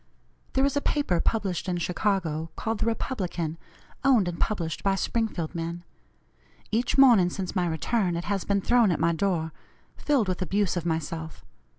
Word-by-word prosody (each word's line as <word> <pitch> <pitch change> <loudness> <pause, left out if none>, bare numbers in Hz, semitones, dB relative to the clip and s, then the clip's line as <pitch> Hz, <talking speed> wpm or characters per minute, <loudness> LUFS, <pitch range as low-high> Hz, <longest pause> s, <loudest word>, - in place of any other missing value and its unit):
There 265 +1 +3
is 280 - 0
a 285 - +1
paper 280 - +1
published 195 -4 -1
in 175 - 0
Chicago 170 -3 -1
called 225 -1 -2
the 225 - 0
Republican, 180 - -2 0.4
owned 250 -9 +4
and 175 -1 -4
published 170 -7 -1
by 195 -1 +2
Springfield 195 -6 -2
men. 170 0 -4 0.9
Each 230 +5 0
morning 235 -10 +7
since 185 +1 -5
my 180 -2 +1
return 175 +3 0
it 170 - -3
has 200 -2 -1
been 200 -1 0
thrown 240 0 +4
at 175 - 0
my 165 +1 +2
door, 165 -2 -1 0.4
filled 275 -8 +1
with 185 0 -2
abuse 195 +1 0
of 175 -1 -2
myself. 160 0 -4
185 Hz, 170 wpm, -27 LUFS, 170-220 Hz, 0.9 s, morning